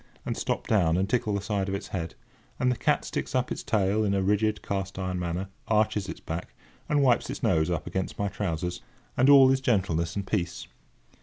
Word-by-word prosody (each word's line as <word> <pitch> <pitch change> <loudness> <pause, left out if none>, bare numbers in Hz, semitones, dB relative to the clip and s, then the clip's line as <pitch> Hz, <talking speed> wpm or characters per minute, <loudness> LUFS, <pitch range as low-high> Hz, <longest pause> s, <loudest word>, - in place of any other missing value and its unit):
and - - -2
stop - - -2
down 90 -6 +3
and 95 +1 +1
tickle 110 -2 0
the 100 - -1
side 100 -1 -1
of 95 - -1
its 100 0 -6
head; 85 -3 -4 0.4
and 125 0 +3
the - - 0
cat - - +1
sticks - - -4
up 125 -1 0
its - - -3
tail 105 0 +1
in 100 -1 +1
a 95 - +1
rigid, 105 +2 +1
cast 95 -1 -3
iron 95 -1 -2
manner, 90 +2 -3 0.2
arches 105 -2 +1
its - - -6
back, 80 +1 -6 0.3
and 145 -1 +3
wipes 125 -3 +3
its - - -5
nose 80 +1 +2
up 85 -2 -2
against 95 -1 -3
my 100 - 0
trousers; 90 -3 -3 0.3
and 130 +3 +4
all 135 -2 +8
is 135 0 +1
gentleness 90 -9 0
and 100 -1 -2
peace. 90 -4 -2
100 Hz, 215 wpm, -27 LUFS, 90-110 Hz, 0.4 s, all